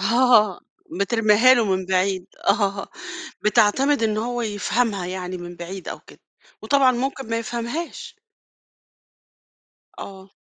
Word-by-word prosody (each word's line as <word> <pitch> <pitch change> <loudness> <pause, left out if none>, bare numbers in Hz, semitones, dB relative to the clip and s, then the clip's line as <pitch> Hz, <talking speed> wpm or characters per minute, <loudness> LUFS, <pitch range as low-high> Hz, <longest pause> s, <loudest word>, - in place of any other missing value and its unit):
آه 220 -2 +4 0.4
بترميها 225 +3 +4
له 235 -3 +2
من 190 -2 -1
بعيد 185 0 0 0.2
آه 200 -1 +1 0.6
بتعتمد 230 +6 +3
إنه 215 0 0
هو 240 0 -3
يفهمها 205 -2 -1
يعني 185 0 -5
من 175 0 -9
بعيد 180 +2 -8
أو - - -5
كده. - - -18 0.4
وطبعًا 270 -2 +4
ممكن 265 0 -3
ما 230 - 0
يفهمهاش. 300 - -5 1.8
آه. 190 0 -10
215 Hz, 115 wpm, -22 LUFS, 190-245 Hz, 1.8 s, آه